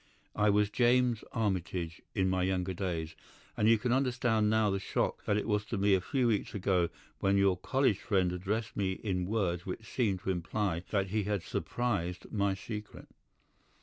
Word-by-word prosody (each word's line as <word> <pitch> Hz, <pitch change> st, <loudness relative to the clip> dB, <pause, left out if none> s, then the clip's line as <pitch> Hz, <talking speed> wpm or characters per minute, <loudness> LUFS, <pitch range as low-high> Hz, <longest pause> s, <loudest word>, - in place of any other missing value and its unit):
I 105 Hz, 0 st, +3 dB
was 105 Hz, 0 st, +3 dB
James 120 Hz, 0 st, +3 dB
Armitage 90 Hz, -6 st, -2 dB
in 95 Hz, -3 st, +2 dB
my 95 Hz, 0 st, +1 dB
younger 95 Hz, 0 st, 0 dB
days, 85 Hz, -3 st, -3 dB, 0.4 s
and 105 Hz, -, +3 dB
you 115 Hz, -, +6 dB
can 125 Hz, +3 st, -1 dB
understand 120 Hz, -4 st, +2 dB
now 110 Hz, -1 st, +3 dB
the 95 Hz, -, 0 dB
shock -, -, -1 dB
that 105 Hz, -, +2 dB
it 105 Hz, -, -2 dB
was 105 Hz, -2 st, +1 dB
to 115 Hz, -, -3 dB
me 100 Hz, +1 st, +3 dB
a 95 Hz, -, +3 dB
few 125 Hz, +4 st, +1 dB
weeks 105 Hz, -2 st, -1 dB
ago 90 Hz, -3 st, +1 dB, 0.3 s
when 100 Hz, 0 st, +2 dB
your 100 Hz, -1 st, +4 dB
college 130 Hz, -1 st, +1 dB
friend 95 Hz, -3 st, +1 dB
addressed 100 Hz, +5 st, -2 dB
me 95 Hz, -2 st, 0 dB
in 90 Hz, -3 st, -2 dB
words 95 Hz, -5 st, 0 dB
which 105 Hz, +4 st, -5 dB
seemed 105 Hz, -6 st, 0 dB
to 95 Hz, -, -1 dB
imply 90 Hz, 0 st, -1 dB
that 95 Hz, -2 st, 0 dB
he 105 Hz, 0 st, 0 dB
had 100 Hz, -4 st, -1 dB
surmised 95 Hz, -8 st, -2 dB
my 100 Hz, -2 st, +1 dB
secret. 105 Hz, +2 st, -8 dB
100 Hz, 180 wpm, -31 LUFS, 95-110 Hz, 0.4 s, you